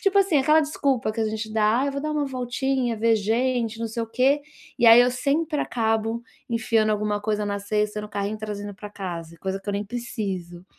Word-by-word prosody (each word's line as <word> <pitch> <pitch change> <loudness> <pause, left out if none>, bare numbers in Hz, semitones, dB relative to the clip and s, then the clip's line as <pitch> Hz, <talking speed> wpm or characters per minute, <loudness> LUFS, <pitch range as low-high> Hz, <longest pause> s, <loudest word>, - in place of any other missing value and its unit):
tipo 395 -1 +3
assim, 380 -5 +3
aquela 305 +4 +5
desculpa 275 -6 0
que 225 - -4
a - - +2
gente 220 0 -4
dá: 215 +2 +3
"Ah, 275 - +1
eu 280 - -1
vou 280 - -3
dar 305 - -2
uma 300 -1 0
voltinha, 255 -1 -1
ver 225 +1 +3
gente, 230 +1 0
não 230 -1 -2
sei 230 +1 -3
o 230 - -4
quê". 265 +5 +2 0.4
E 235 - +4
aí 230 +1 +10
eu 245 +1 +4
sempre 295 +4 0
acabo 225 0 0 0.3
enfiando 225 -1 +1
alguma 210 -1 0
coisa 210 0 -1
na 200 0 -2
cesta, 210 +1 -1
no 210 - -7
carrinho, 205 +1 -2
e - - -15
trazendo 205 -1 -5
pra 205 +2 -9
casa, 170 -5 -6
coisa 190 0 -3
que 205 - -11
eu 205 - 0
nem 205 +1 -2
preciso. 195 -6 -5
225 Hz, 230 wpm, -24 LUFS, 210-255 Hz, 0.4 s, aí